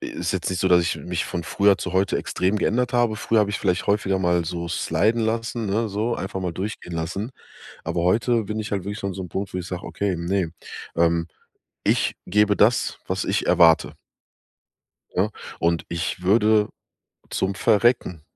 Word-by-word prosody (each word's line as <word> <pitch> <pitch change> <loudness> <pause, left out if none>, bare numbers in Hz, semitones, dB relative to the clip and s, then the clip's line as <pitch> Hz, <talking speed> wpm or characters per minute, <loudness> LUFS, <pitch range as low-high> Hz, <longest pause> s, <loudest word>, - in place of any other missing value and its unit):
ist - - -3
jetzt - - -2
nicht 90 - -2
so, 95 - +2
dass 90 -1 +5
ich 85 - -1
mich 90 -1 -3
von 85 -2 -4
früher 100 +5 +3
zu 95 - -4
heute 95 +1 +2
extrem 95 +3 0
geändert 120 +4 +1
habe. 120 -3 +2
Früher 110 0 +2
hab 100 - +2
ich 105 - -2
vielleicht 90 -2 0
häufiger 100 -2 +1
mal 85 -2 +1
so 85 +1 -4
sliden 110 +6 +1
lassen, 115 0 -1
ne, 110 +3 0
so, 110 +4 -1
einfach 95 0 -4
mal 90 -2 -2
durchgehen 95 -1 -5
lassen. 90 +8 -3 0.5
Aber 85 - -1
heute 115 +5 +2
bin 105 +2 -4
ich 110 - -5
halt 95 -3 -1
wirklich 105 0 -5
an 100 -1 -2
so 95 - -6
'nem 90 - -8
Punkt, 95 +1 -4
wo - - -2
ich 90 0 -5
sag: 90 0 -5
„Okay, 100 -3 -2
ne, 85 0 -1 0.4
ähm, 85 0 +2 0.6
ich - - +2
gebe 105 +2 +3
das, 110 +3 +3
was - - -1
ich - - 0
erwarte.“ 80 -1 +5 1.2
Ne, 100 +4 +1 0.3
und 85 0 +1
ich 85 +1 -3
würde 105 +2 +4 0.6
zum 95 0 -1
Verrecken 110 -7 +2
95 Hz, 185 wpm, -23 LUFS, 90-105 Hz, 1.2 s, dass